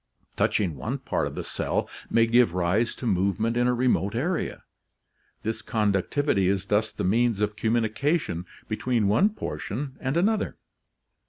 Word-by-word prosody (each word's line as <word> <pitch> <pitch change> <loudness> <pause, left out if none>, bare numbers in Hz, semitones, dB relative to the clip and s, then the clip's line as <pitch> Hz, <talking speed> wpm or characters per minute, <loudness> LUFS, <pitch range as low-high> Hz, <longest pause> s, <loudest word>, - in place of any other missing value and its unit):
Touching 90 -7 +1
one 65 - -3
part - - -1
of - - -7
the - - -4
cell - - -2 0.2
may 115 0 +4
give 115 -6 +3
rise 90 +6 +1
to - - -7
movement 100 +3 +1
in 120 0 +2
a 125 - +3
remote 115 -5 +1
area. 160 +9 -2 0.8
This 110 +1 -2
conductivity 105 +1 +1
is 95 0 0
thus 105 +2 +1
the - - -4
means 115 +2 +2
of 105 0 0
commu 110 +1 +1
nication 110 - -1 0.2
between 115 0 0
one 110 - +4
portion 135 - -5
and 135 +4 -1
another. 210 +4 +1
110 Hz, 155 wpm, -26 LUFS, 100-125 Hz, 0.8 s, may